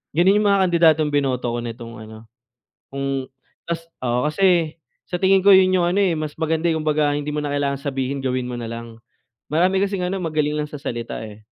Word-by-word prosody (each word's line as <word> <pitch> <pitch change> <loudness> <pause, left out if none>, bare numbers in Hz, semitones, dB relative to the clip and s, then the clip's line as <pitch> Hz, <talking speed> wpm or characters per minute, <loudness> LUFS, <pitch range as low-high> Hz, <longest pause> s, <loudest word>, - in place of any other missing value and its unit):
gano'n 185 +4 +4
'yong 210 - +2
mga 200 -1 +4
kandidatong 160 -3 +3
binoto 135 -4 0
ko 120 - -2
nitong 115 0 -7
ano, 110 0 -11 0.7
kung 135 -1 -3 0.4
tas 170 0 -3 0.2
oo. 125 +3 +1
Kasi 170 -2 +2 0.3
sa 180 - -2
tingin 190 +1 +4
ko 200 - +4
yun 185 0 +5
yung 175 -2 +3
ano, 180 - -1
eh, 190 -4 +2
mas 155 -2 -4
maganda, 160 +1 0
eh, 160 - +1
kumbaga 150 -1 +1
hindi 145 0 -4
mo 150 - -1
na 145 - -3
kailangang 140 -1 -1
sabihin, 135 -1 -3
gawin 130 -1 -1
mo - - -5
na 115 -1 -5
lang. 115 0 -8 0.5
Marami 185 +5 +2
kasing 195 -2 -1
ano, 190 +2 -2
magaling 155 -3 0
lang 150 0 -3
sa 150 - -7
salita, 120 -5 -4
eh. 105 0 -12
150 Hz, 205 wpm, -21 LUFS, 130-175 Hz, 0.7 s, yun